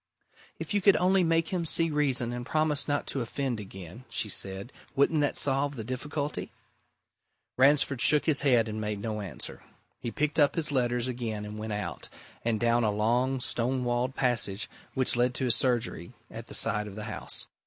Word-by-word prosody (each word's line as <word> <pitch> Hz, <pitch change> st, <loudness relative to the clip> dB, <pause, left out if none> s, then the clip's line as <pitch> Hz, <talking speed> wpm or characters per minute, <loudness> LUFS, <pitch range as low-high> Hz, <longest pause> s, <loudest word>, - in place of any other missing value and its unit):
"If -, -, -5 dB
you 205 Hz, -, +2 dB
could 200 Hz, 0 st, +6 dB
only 185 Hz, +1 st, +3 dB
make 165 Hz, -1 st, +1 dB
him 180 Hz, -3 st, -1 dB
see 165 Hz, 0 st, +2 dB
reason 135 Hz, -5 st, +1 dB
and 120 Hz, 0 st, -4 dB
promise 150 Hz, +1 st, +1 dB
not 145 Hz, -1 st, 0 dB
to 135 Hz, -, -3 dB
offend 125 Hz, 0 st, -3 dB
again," 95 Hz, +2 st, -10 dB
she 105 Hz, -, -2 dB
said. 95 Hz, +4 st, -2 dB, 0.2 s
"Wouldn't 145 Hz, +3 st, +3 dB
that 145 Hz, -, 0 dB
solve 140 Hz, +1 st, +2 dB
the 115 Hz, -, -5 dB
difficulty?" 145 Hz, +5 st, -4 dB, 1.0 s
Ransford 135 Hz, -1 st, +4 dB
shook 150 Hz, 0 st, +6 dB
his 155 Hz, -3 st, +5 dB
head 125 Hz, -5 st, +3 dB
and 110 Hz, 0 st, -4 dB
made 105 Hz, -1 st, -3 dB
no 105 Hz, 0 st, -4 dB
answer. 100 Hz, -, -7 dB, 0.4 s
He 120 Hz, -, -4 dB
picked 150 Hz, +7 st, -1 dB
up 145 Hz, -1 st, +4 dB
his 160 Hz, -3 st, 0 dB
letters 120 Hz, -2 st, +1 dB
again 115 Hz, -4 st, -4 dB
and 105 Hz, +1 st, -7 dB
went 110 Hz, 0 st, -4 dB
out, 105 Hz, -4 st, -5 dB, 0.3 s
and 115 Hz, -2 st, 0 dB
down 120 Hz, +1 st, +2 dB
a 110 Hz, -, +2 dB
long 120 Hz, +6 st, +1 dB
stone 125 Hz, +2 st, -1 dB
walled 120 Hz, +2 st, -1 dB
passage 115 Hz, -5 st, 0 dB, 0.3 s
which 130 Hz, -2 st, +2 dB
led 125 Hz, +1 st, +1 dB
to 130 Hz, -, -1 dB
his 120 Hz, -, +4 dB
surgery 120 Hz, -6 st, -1 dB, 0.2 s
at 115 Hz, 0 st, -8 dB
the -, -, -6 dB
side 105 Hz, -1 st, +2 dB
of 100 Hz, -, -9 dB
the 105 Hz, -, -6 dB
house. -, -, -3 dB
125 Hz, 190 wpm, -28 LUFS, 110-145 Hz, 1.0 s, could